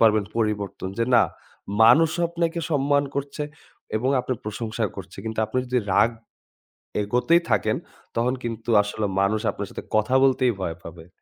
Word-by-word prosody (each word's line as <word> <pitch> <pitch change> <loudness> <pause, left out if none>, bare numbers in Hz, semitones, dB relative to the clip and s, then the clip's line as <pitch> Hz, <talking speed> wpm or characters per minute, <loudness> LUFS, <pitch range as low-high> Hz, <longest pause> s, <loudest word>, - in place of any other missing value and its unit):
পারবেন 110 -2 +5
পরিবর্তন। 105 -4 -1
যে 115 - +3
না - - +7 0.6
মানুষ 155 +8 +6 0.2
আপনাকে 170 0 -1
সম্মান 145 0 +2
করছে 140 +2 -3 0.5
এবং 130 +5 0
আপনার 125 -2 -3
প্রশংসা 110 +1 -3
করছে। 95 -1 -9
কিন্তু 110 0 -5
আপনি 125 +4 -2
যদি 125 0 +1 0.2
রাগ 115 - +5 0.9
এগতেই 125 +11 +3
থাকেন 105 - +2 0.4
তখন 120 +3 +1
কিন্তু 115 0 -4
আসলে 105 +1 -2
মানুষ 105 +2 +2
আপনার - - -6
সাথে - - -7
কথা 110 +4 +2
বলতেই 130 -2 +3
ভয় 85 -3 -3
পাবে। 85 0 -10
115 Hz, 150 wpm, -24 LUFS, 105-130 Hz, 0.9 s, না